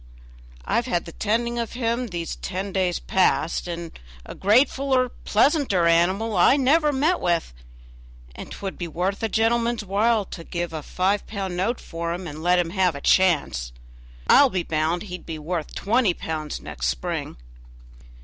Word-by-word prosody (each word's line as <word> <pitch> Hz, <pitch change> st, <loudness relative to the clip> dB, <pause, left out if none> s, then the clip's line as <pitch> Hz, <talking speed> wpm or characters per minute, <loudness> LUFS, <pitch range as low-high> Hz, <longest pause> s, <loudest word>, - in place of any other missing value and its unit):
I've 235 Hz, -, 0 dB
had 175 Hz, -7 st, -1 dB
the 170 Hz, -, -8 dB
tending 235 Hz, +5 st, -1 dB
of 230 Hz, -, -3 dB
him 240 Hz, 0 st, -1 dB
these 170 Hz, -5 st, -4 dB
ten 195 Hz, +1 st, -4 dB
days 185 Hz, -2 st, +1 dB
past, 180 Hz, -2 st, +1 dB
and 170 Hz, -1 st, -5 dB, 0.3 s
a -, -, -8 dB
gratefuller, 255 Hz, +4 st, +2 dB
pleasanter 240 Hz, -, +3 dB
animal 185 Hz, +6 st, +2 dB
I 185 Hz, +10 st, +5 dB
never 295 Hz, +3 st, +3 dB
met 300 Hz, +6 st, +1 dB
with, 170 Hz, -, 0 dB, 0.8 s
and -, -, -9 dB
'twould 195 Hz, -1 st, -6 dB
be 175 Hz, -, -3 dB
worth 180 Hz, +5 st, -2 dB
a 225 Hz, -, -1 dB
gentleman's 230 Hz, 0 st, +1 dB
while 210 Hz, +2 st, +2 dB
to 170 Hz, -, -9 dB
give 175 Hz, 0 st, -4 dB
a 155 Hz, -, -4 dB
five 190 Hz, +6 st, -1 dB
pound 195 Hz, -4 st, -4 dB
note 210 Hz, +7 st, -1 dB
for 170 Hz, 0 st, -4 dB
him, 180 Hz, +1 st, -7 dB
and 155 Hz, -1 st, -7 dB
let 180 Hz, +2 st, +3 dB
him 175 Hz, -2 st, 0 dB
have 185 Hz, -3 st, +1 dB
a 140 Hz, -, -7 dB
chance. 140 Hz, -, +2 dB, 0.5 s
I'll 285 Hz, -, +6 dB
be 185 Hz, -6 st, -1 dB
bound 160 Hz, +3 st, -1 dB
he'd 180 Hz, -3 st, -8 dB
be 160 Hz, -1 st, -6 dB
worth 160 Hz, +1 st, -4 dB
twenty 215 Hz, -3 st, +2 dB
pounds 155 Hz, -2 st, -4 dB
next 60 Hz, +1 st, -4 dB
spring." -, -, -3 dB
190 Hz, 165 wpm, -24 LUFS, 170-230 Hz, 0.8 s, I'll